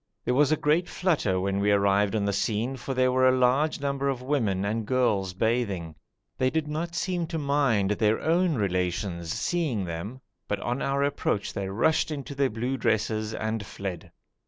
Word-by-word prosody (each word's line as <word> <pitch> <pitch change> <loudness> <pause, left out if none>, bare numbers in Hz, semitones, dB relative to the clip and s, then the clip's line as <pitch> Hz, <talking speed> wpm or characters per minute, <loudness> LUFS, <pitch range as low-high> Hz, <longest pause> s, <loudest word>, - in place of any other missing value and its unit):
There 125 - +1
was 145 +3 +4
a 155 - +3
great 155 +5 +1
flutter 145 - +1
when 100 +1 -1
we 100 +1 +2
arrived 100 +1 +3
on 105 -2 0
the 100 - 0
scene, 110 +6 -1
for 130 +1 -5
there 130 0 +3
were 130 0 +4
a 130 - +2
large 135 +5 +2
number 140 0 -1
of 135 -3 -1
women 110 -9 0
and 110 +2 -1
girls 105 -6 +1
bathing. 100 -7 -1 0.5
They 130 - +3
did 155 +1 -1
not 165 +3 -3
seem 175 0 -1
to 165 0 -3
mind 140 -9 +1
their 105 +1 +2
own 170 0 +2
relations 90 -4 -1
seeing 145 - -1
them, 90 +9 -6 0.3
but 105 - -1
on 120 +3 -2
our 140 0 0
approach 140 -7 -1
they 95 -1 -3
rushed 155 +13 +2
into 140 -2 -5
their 140 -1 +1
blue 120 +5 -2
dresses 110 -1 0
and 110 -1 -2
fled. 95 -4 -6
120 Hz, 185 wpm, -27 LUFS, 100-140 Hz, 0.5 s, was